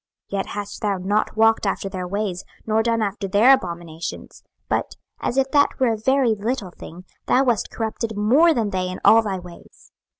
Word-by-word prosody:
26:016:047 200 - -1
Yet - - -2
hast 205 -1 -6
thou 205 -2 0
not 205 +4 -1
walked 225 -1 +3
after 195 - -2
their 185 -2 -5
ways, 195 -1 -3 0.2
nor 220 0 +2
done 230 -1 0
after 200 -1 -3
their 210 +7 +6
abominations: 170 -7 -5 0.3
but, - - -2 0.2
as 250 - -3
if 270 0 +1
that 285 -1 +2
were 250 -3 +3
a - - -1
very 255 +2 +2
little 215 -2 -3
thing, 180 +1 -12 0.2
thou 260 - +4
wast 240 -5 0
corrupted 220 -1 -4
more 265 +12 +4
than 225 -8 0
they 185 -1 -2
in 185 - -6
all 225 - +7
thy 200 -4 -3
ways. 175 -1 -14
210 Hz, 195 wpm, -22 LUFS, 190-230 Hz, 0.3 s, all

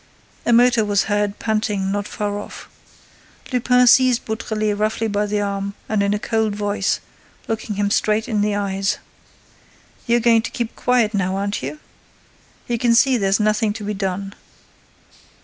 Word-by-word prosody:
A - - +4
motor 240 0 +5
was 205 -1 +1
heard 205 0 -1
panting 215 -3 -1
not 205 +1 -2
far 205 -1 -3
off. - - -10 0.9
Lupin 250 0 +4
seized 250 0 +5
Beautrelet 215 -1 -2
roughly 215 +2 -1
by 205 0 -1
the 205 0 -1
arm 200 0 -3
and 215 -2 0
in 200 0 +1
a - - 0
cold 220 -1 -1
voice, 205 -1 -1 0.5
looking 220 -1 -3
him 205 0 0
straight 215 +1 +1
in 215 -3 0
the 205 0 +1
eyes: 195 -1 -1 1.1
"You're 235 +1 +3
going 230 -1 +4
to 240 - -5
keep 235 -2 -4
quiet 240 -3 +1
now, 190 -2 0
aren't 200 +1 -2
you? - - -5 0.9
You 235 -1 -1
can 235 -1 +3
see 260 +2 +4
there's 195 -3 +1
nothing 215 0 +1
to 215 - -7
be 210 +1 -3
done. 195 0 -3
210 Hz, 165 wpm, -20 LUFS, 205-230 Hz, 1.1 s, motor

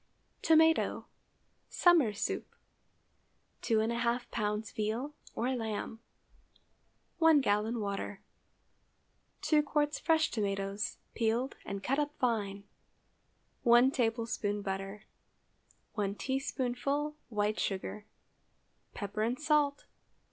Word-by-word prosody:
TOMATO 320 0 +4 0.6
(Summer 335 -11 +5
soup). 205 - -3 1.1
✠ 230 +1 +1
2½ 235 +1 +1
lbs. 210 0 -2
veal, 225 +7 -2 0.2
or 255 +3 0
lamb. 225 -1 -4 1.2
1 325 -2 +6
gallon 220 -1 +1
water. 200 -1 -3 1.2
2 305 -2 +4
qts. 295 0 0
fresh 320 -1 +3
tomatoes, 200 -1 -2 0.2
peeled 235 +3 0
and 200 0 -4
cut 275 +3 +1
up 295 0 -2
fine. 205 -5 -1 1.0
1 240 +2 +6
tablespoonful 225 -4 -1
butter. 195 +1 -4 0.9
1 200 -2 -1
teaspoonful 270 +3 -1
white 210 -1 0
sugar. 205 +2 -3 0.9
Pepper 205 0 -4
and 235 +4 0
salt. 300 -2 +2
230 Hz, 90 wpm, -32 LUFS, 210-275 Hz, 1.2 s, 1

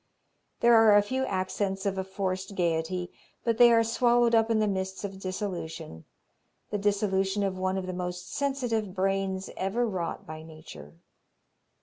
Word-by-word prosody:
There 235 0 +6
are 225 -2 +7
a - - +6
few 260 +5 -1
accents 190 +1 -2
of 195 -1 0
a 190 - -2
forced 190 0 -3
gayety, 175 +1 -1 0.3
but 230 -1 0
they 240 -1 +8
are 230 0 +5
swallowed 235 +1 +3
up 225 0 +4
in 225 - +2
the 215 -1 +2
mists 190 -1 -3
of 195 -1 -5
dissolution 185 - -5 0.7
the 210 - -1
dissolution 200 -1 +1
of 190 -1 -2
one 185 0 0
of 190 - -3
the 185 - -4
most 180 0 -5
sensitive 245 -8 -1
brains 195 0 -1
ever 200 +6 0
wrought 180 -5 -4
by 155 0 -8
nature. 155 - -12
195 Hz, 160 wpm, -28 LUFS, 185-215 Hz, 0.7 s, they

